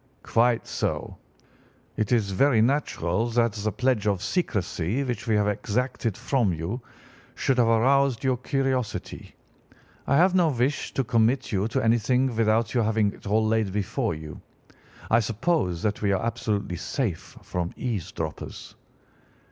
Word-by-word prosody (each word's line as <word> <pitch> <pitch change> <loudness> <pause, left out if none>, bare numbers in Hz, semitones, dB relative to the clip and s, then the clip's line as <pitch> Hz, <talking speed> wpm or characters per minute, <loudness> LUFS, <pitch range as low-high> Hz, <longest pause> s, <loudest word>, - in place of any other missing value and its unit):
"'Quite 120 0 +2
so. - - -3 0.8
It 110 0 -1
is 110 -5 +2
very 125 +4 +3
natural 115 - +1
that 115 0 +2
the 105 0 -2
pledge 125 -3 0
of 100 -2 0
secrecy 105 - -1
which 120 -3 -4
we 110 - +2
have 105 -1 +2
exacted 115 +1 -1
from 120 -8 +1
you 85 +9 -4 0.5
should 130 -2 +1
have 120 - +4
aroused 130 +2 +3
your 130 -2 +2
curiosity. 130 -2 -2 0.7
I 140 - +3
have 185 +3 +5
no 180 -3 +4
wish 135 +1 -1
to 135 - +1
commit 115 +3 +1
you 100 0 +1
to 115 - -1
anything 120 +2 +2
without 110 0 +2
your 120 -3 +2
having 110 -2 +1
it - - -12
all 110 +2 +2
laid 110 -2 +1
before 105 - -1
you. 75 -1 -9 0.7
I 115 - +6
suppose 115 - 0
that 105 -2 -1
we 100 -2 +2
are 95 +3 -1
absolutely 110 -6 -2
safe 105 - -3
from 90 -1 -3
eavesdroppers? 110 -9 -5
115 Hz, 150 wpm, -26 LUFS, 105-125 Hz, 0.8 s, I